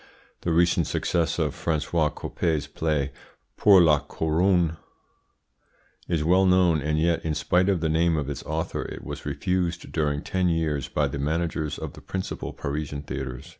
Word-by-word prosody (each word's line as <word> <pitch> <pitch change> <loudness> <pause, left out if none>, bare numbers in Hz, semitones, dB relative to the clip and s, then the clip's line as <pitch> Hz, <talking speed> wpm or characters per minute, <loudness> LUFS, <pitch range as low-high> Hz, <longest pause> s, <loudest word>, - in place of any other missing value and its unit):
The 85 - -1
recent 85 +1 +3
success 85 -3 0
of - - 0
Francois 80 0 0
Coppee's 80 -2 -2
play 70 -1 -1 0.4
"Pour 95 -4 +7
la 75 -3 +5
Couronne" 85 +1 +1 1.3
is 85 -3 0
well 95 +4 +4
known, 90 -4 +4
and 75 +2 0
yet, 85 +1 +1
in 80 -1 -1
spite 90 +5 +2
of 95 -4 +1
the 80 - +1
name 80 +1 +2
of 75 -3 -2
its 70 - -4
author, 80 +1 -3
it - - -7
was - - -7
refused 90 -2 -2
during 75 -2 -1
ten 90 -1 0
years 80 -5 0
by - - 0
the 70 - -5
managers 80 0 -1
of - - -6
the - - -12
principal 95 -1 -4
Parisian 70 0 -4
theatres. 65 +2 -6
80 Hz, 165 wpm, -25 LUFS, 75-85 Hz, 1.3 s, Pour